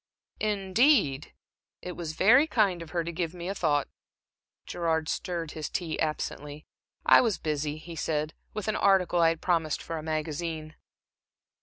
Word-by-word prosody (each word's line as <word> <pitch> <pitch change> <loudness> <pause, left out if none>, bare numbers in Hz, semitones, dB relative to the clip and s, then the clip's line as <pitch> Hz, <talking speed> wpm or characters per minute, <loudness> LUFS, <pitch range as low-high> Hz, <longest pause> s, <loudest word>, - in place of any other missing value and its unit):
"Indeed! 200 - +2 0.5
It 180 - -5
was 170 -3 -5
very 245 - +5
kind 200 - +2
of 165 - -8
her 170 0 -1
to 170 - -4
give 170 0 -3
me 175 0 -6
a 195 - -1
thought." 150 -7 +1 0.8
Gerard 160 -2 -1
stirred 170 -2 -3
his 155 -1 -5
tea 165 -3 -3
absently. 150 -1 -3 0.4
"I - - +8
was 225 -5 +1
busy," 150 -1 -2
he 165 +2 -9
said 155 -1 -2 0.2
"with 215 -1 -5
an 215 - 0
article 190 -3 +3
I 165 - +6
had 165 -1 -3
promised 165 -4 +1
for 165 -1 -4
a - - -6
magazine." 155 0 -3
165 Hz, 160 wpm, -28 LUFS, 155-185 Hz, 0.8 s, I